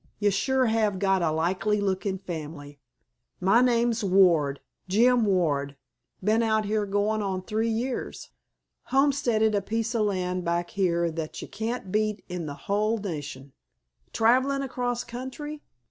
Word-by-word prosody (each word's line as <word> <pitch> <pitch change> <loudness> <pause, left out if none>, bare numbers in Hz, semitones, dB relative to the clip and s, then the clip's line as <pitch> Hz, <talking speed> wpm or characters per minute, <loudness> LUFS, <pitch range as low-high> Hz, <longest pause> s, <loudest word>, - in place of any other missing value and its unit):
Ye 205 0 +2
sure 260 +6 +1
have 220 -3 +1
got 195 -1 +2
a 165 - +2
likely 185 +6 0
lookin' 195 -1 -1
family. 150 -5 -7 0.6
My 195 +6 +4
name's 235 -2 +2
Ward—Jim 190 - +2
Ward. 145 -7 +1 0.5
B'en 215 +3 +3
out 220 -1 +1
here 210 0 0
goin' 205 +2 0
on 190 -2 -2
three 220 +4 -1
years. 240 +3 -3 0.6
Homesteaded 260 -6 +2
a 205 - +1
piece 225 +3 -2
o' 230 - +1
land 185 -3 -1
back 170 0 -1
here 170 -3 +1
that 160 -1 -5
ye - - -8
can't 220 -1 -4
beat 215 0 -1
in 180 -3 -5
the 145 - -5
hull 215 +3 +1
nation. 145 -8 -6 0.6
Travelin' 260 +5 +2
across 245 -2 -2
country? 260 +5 -7
205 Hz, 140 wpm, -26 LUFS, 180-230 Hz, 0.6 s, My